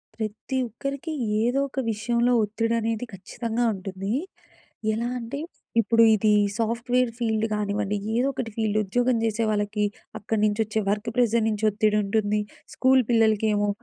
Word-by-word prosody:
ప్రతి 220 +4 -4
ఒక్కరికి 275 +7 -5 0.3
ఏదో 245 +4 +1
ఒక 270 - -4
విషయంలో 235 +3 +1
ఒత్తిడి 225 +2 -1
అనేది 225 +1 -2
ఖచ్చితంగా 230 +5 -3
ఉంటుంది. 195 +1 -4 0.8
ఎలా 230 +2 -1
అంటే 235 +4 -5 0.4
ఇప్పుడు 230 +1 +4
ఇది 215 +1 +2 0.3
సాఫ్ట్‌వేర్ 235 +2 +1
ఫీల్డ్ 220 -2 +1
కానివ్వండి, 205 -1 -1 0.2
ఏదో 250 +3 +2
ఒకటి 235 -3 -4
ఫీల్డ్ 215 -1 0
ఉద్యోగం 245 +4 +1
చేసే 225 +1 0
వాళ్ళకి, 210 0 0 0.3
అక్కడి 210 +1 -1
నుంచొచ్చే 215 +1 0
వర్క్ 210 +2 -1
ప్రెజర్ 235 -2 +3
నుంచి 215 0 -1
ఒత్తిడి 210 +1 +2
ఉంటుంది, 210 +1 +1 0.3
స్కూలు 260 0 +4
పిల్లలకేమో 215 -2 +3
220 Hz, 135 wpm, -25 LUFS, 210-235 Hz, 0.8 s, ఇప్పుడు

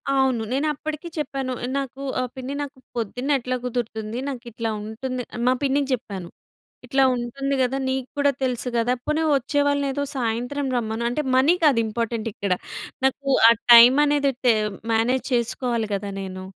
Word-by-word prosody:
అవును. 265 -3 +2
నేనప్పడికీ 305 +3 -2
చెప్పాను. 270 -3 -2 0.2
నాకూ 275 -1 -4 0.2
ఆహ్, 255 -1 -2
పిన్ని 260 +1 -5
నాకు 285 -1 -6 0.2
పొద్దున్నెట్లా 250 +3 -1
కుదురుతుంది, 230 -2 -3
నాకిట్లా 235 -3 -5
ఉంటుంది 250 +4 -4
ఆహ్, 240 - -4
మా 255 - +5
పిన్నికి 280 0 +1
జెప్పాను. 200 -8 -5 0.6
ఇట్లా 270 +2 +2
ఉంటుంది 260 +3 -3
గదా, 255 +1 +1
నీక్కూడా 265 +2 0
తెలుసు 250 -1 -1
గదా! 235 +1 +2
పోని 305 +1 0
వచ్చే 280 +2 0
వాళ్ళనేదో 285 -1 0
సాయంత్రం 245 +3 -2
రమ్మను. 225 -1 -2
అంటే, 245 +5 -1
మనీ 275 +6 +5
కాదు 280 -6 +5
ఇంపార్టెంటిక్కడ, 220 -3 -2 0.5
నాకు 275 +1 0 0.2
ఆ - - +9 0.2
టైమనేది 280 +4 +7 0.2
టేమ్ 215 -3 +2 0.2
మేనేజ్ 235 +3 +2
చేసుకోవాలి 235 -1 0
గదా 200 0 -3
నేను. 185 -1 -6
250 Hz, 140 wpm, -23 LUFS, 230-275 Hz, 0.6 s, ఆ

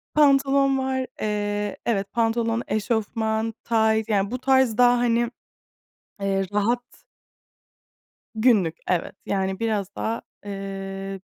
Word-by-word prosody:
Pantolon 275 -2 +4
var. 260 -1 -1
Eee, 205 -1 -1
evet, 200 -4 0
pantolon, 230 0 +1
eşofman, 220 0 -1
tayt 220 -1 +2
yani 200 0 +1
bu 250 - -3
tarz 260 -4 +3
daha, 245 0 +6
hani, 240 0 +1 0.9
eee, 195 -1 0
rahat. 235 +4 +2 1.5
Günlük, 215 -8 +3
evet. 180 +1 -1
Yani, 190 -1 -1
biraz 210 -4 -1
daha, 225 +1 -2 0.2
eee, 195 -1 -5
220 Hz, 105 wpm, -24 LUFS, 200-240 Hz, 1.5 s, daha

